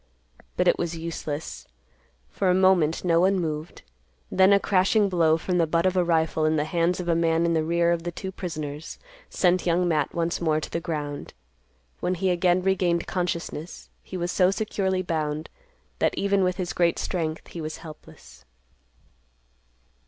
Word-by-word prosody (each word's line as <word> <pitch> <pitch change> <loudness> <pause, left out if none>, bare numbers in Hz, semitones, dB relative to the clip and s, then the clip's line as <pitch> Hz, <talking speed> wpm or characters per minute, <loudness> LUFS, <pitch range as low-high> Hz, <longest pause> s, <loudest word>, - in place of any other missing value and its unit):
But - - +2
it - - +3
was 170 -1 -2
useless. 160 -2 -5 0.6
For 190 - 0
a 180 - +4
moment, 185 -4 +3
no 165 -1 +3
one 190 +1 +3
moved. 155 -1 -4 0.5
Then 190 +1 +5
a 200 - +6
crashing 200 +2 +2
blow, 165 -3 +3
from 180 +2 -1
the 165 - +3
butt 165 +2 +1
of 185 0 +2
a 180 - +3
rifle 160 -2 +1
in 155 0 +2
the 150 - +1
hands 170 +2 0
of 180 - -4
a 170 - +3
man 165 0 +2
in 170 - +1
the 160 -1 +1
rear 170 +1 +2
of 170 -1 0
the 175 +1 -4
two 190 +2 -6
prisoners, 155 -5 -6 0.3
sent 180 0 +1
Young 175 +1 +2
Matt 150 -4 0
once 170 0 -1
more 155 -2 +2
to - - -7
the 170 - -1
ground. 150 -4 -5 0.6
When 180 - -1
he 185 +1 0
again 180 +1 +2
regained 180 -3 +1
consciousness, 175 -2 -4
he 185 - -7
was 175 0 -2
so 185 -1 +3
securely 190 -2 -1
bound, 155 -2 -3 0.5
that, - - +1
even 200 -1 +2
with 180 0 0
his 180 -2 -3
great 170 -1 +2
strength, 160 -3 -3
he 170 - -7
was 155 0 -5
helpless. 155 - -13
170 Hz, 180 wpm, -25 LUFS, 160-185 Hz, 0.6 s, a